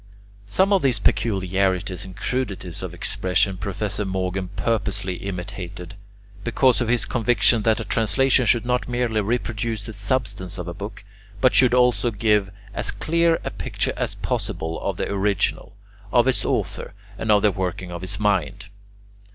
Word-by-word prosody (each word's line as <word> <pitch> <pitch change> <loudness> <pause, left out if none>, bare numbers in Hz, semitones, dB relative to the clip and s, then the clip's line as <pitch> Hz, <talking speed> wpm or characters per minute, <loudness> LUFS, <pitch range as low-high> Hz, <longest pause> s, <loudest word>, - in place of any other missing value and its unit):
Some 190 - +3
of 195 - +4
these 130 -3 +3
peculiarities 95 -2 0
and 95 -2 -11
crudities 100 -9 -3
of - - -5
expression 95 +1 +1
Professor 100 +1 -2
Morgan 95 -1 -2
purposely 100 -1 -2
imitated, 90 -1 -6 0.5
because 125 +2 +3
of 120 - 0
his 120 0 +2
conviction 115 -2 +3
that 110 +1 +2
a 115 - -4
translation 125 +4 +2
should 120 +2 +3
not 125 0 0
merely 120 -3 0
reproduce 110 0 -2
the 110 - -8
substance 100 -3 -2
of 90 -1 -5
a 85 - -4
book, 100 +3 -8 0.4
but 130 - +4
should 125 -1 +5
also 125 -1 +3
give 105 -2 +2 0.2
as - - -1
clear 170 +1 +2
a - - -3
picture - - -2
as - - -2
possible 80 0 -3
of - - -2
the - - -1
original, 100 0 0 0.4
of 120 0 +4
its 130 - +1
author, - - -2 0.2
and 110 - +1
of 105 -1 +4
the 105 - +5
working 95 -1 -3
of 85 0 -6
his 95 +2 -2
mind. 100 -1 0
105 Hz, 160 wpm, -23 LUFS, 95-120 Hz, 0.5 s, should